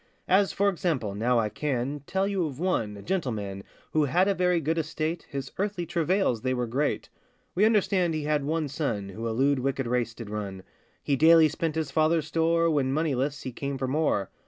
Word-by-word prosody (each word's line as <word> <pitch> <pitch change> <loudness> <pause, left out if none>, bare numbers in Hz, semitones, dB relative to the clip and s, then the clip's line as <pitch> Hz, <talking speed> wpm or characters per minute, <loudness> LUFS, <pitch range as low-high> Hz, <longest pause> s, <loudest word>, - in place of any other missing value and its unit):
As, 195 +1 +4
for 200 +1 +1
example, 160 - -1
now 120 +4 +1
I 110 -2 +1
can 135 +4 -2
Tell 190 +1 0
you 195 -5 0
of 140 -2 -8
one, 115 - -1
a 100 - -10
gentleman, 110 - -3 0.3
Who 155 -1 +3
had 175 +7 +2
a 200 - +3
very 180 -2 +2
good 160 +2 0
estate, 155 +2 -3
His 135 -1 -5
earthly 195 -3 -1
travails 170 - +1
they 130 0 0
were 125 -1 -1
great. 135 +6 -1 0.4
We 200 +4 +3
understand 190 -6 +2
he 155 - -2
had 150 -1 0
one 155 +1 -1
son 125 -9 -3
Who 110 +4 -5
a - - -1
lewd 135 +4 +2
wicked 135 0 -1
race 120 -1 -1
did 115 -3 -8
run; 100 -3 -5 0.4
He 140 - +1
daily 160 +2 +6
spent 160 0 -2
his 155 -3 -2
father's 155 +1 +2
store, 165 +1 +2
When 145 -5 +1
moneyless, 140 -2 -1
he 130 - -4
came 140 +3 -4
for 130 0 -2
more. 130 -9 0
150 Hz, 205 wpm, -27 LUFS, 125-165 Hz, 0.4 s, daily